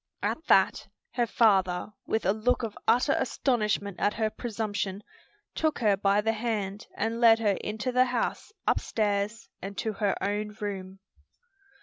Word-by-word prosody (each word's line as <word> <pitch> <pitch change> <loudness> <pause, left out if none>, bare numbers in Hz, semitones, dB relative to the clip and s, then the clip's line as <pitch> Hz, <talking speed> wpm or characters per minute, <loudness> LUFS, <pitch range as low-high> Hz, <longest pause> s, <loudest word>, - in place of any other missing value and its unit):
At 320 - -1
that, 190 - +4 0.2
her 240 -2 0
father, 195 -3 +2
with 220 - 0
a 195 - +3
look 240 +3 0
of 220 -2 -4
utter 245 - +4
astonishment 210 -6 0
at 205 - +1
her 220 -1 0
presumption, 205 -4 -3 0.5
took 315 -1 0
her 210 -4 +3
by 200 +1 +2
the 225 +1 +1
hand 210 -3 -3
and 230 +1 -2
led 225 -1 +7
her 210 -3 +1
into 215 +4 -2
the 250 +1 +4
house, 250 - -2
upstairs 210 +1 0
and 195 +1 -7
to 220 - -2
her 200 -1 0
own 210 +1 -2
room. 195 -2 -5
210 Hz, 150 wpm, -28 LUFS, 200-230 Hz, 0.5 s, led